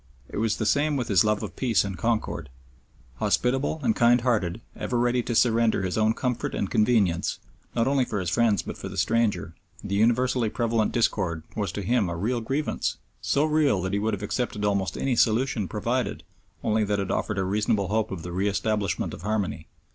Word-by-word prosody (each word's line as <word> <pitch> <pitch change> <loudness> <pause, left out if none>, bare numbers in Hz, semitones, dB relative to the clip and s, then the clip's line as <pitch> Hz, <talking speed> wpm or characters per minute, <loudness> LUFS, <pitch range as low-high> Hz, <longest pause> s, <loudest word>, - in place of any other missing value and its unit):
It - - -6
was 110 0 +1
the 110 - -2
same 145 +7 +2
with 125 - -3
his 95 -5 +5
love 105 -1 +1
of - - -6
peace 120 -4 +2
and 100 -1 -4
concord. 110 - -2 0.7
Hospitable 135 - +1
and 225 - +2
kindhearted, 120 -7 +2 0.2
ever 125 - -2
ready 120 +1 +2
to 120 0 -3
surrender 115 -3 +3
his 90 -1 -2
own 110 +1 +2
comfort 125 -1 -2
and 100 - -2
convenience, 105 -6 +2 0.4
not 115 -1 +2
only 135 -1 +3
for 110 -4 -3
his 90 -2 -2
friends 110 -3 +2
but - - -7
for - - -6
the 95 - -8
stranger, 105 -1 +1 0.3
the 100 - -4
universally 120 +2 +2
prevalent 115 -1 0
discord 95 -9 0
was 100 -5 -1
to 100 - -4
him 110 -2 +1
a 85 - -3
real 115 +6 -1
grievance, 135 +6 -2 0.2
so 145 +2 +2
real 150 -8 +2
that 95 +1 -2
he 100 - +1
would 110 +1 0
have 100 - -9
accepted 105 -1 -2
almost 100 -4 0
any 135 -2 0
solution 115 -2 +2
provided 120 +5 -2 0.4
only 110 0 +2
that 105 0 0
it 100 - -2
offered 110 - -1
a 95 - +1
reasonable 100 0 0
hope 110 +1 0
of 90 -4 -6
the 90 - -6
re 95 +3 0
establishment 105 0 -1
of - - -8
harmony. 100 -6 -2
110 Hz, 200 wpm, -26 LUFS, 100-120 Hz, 0.7 s, his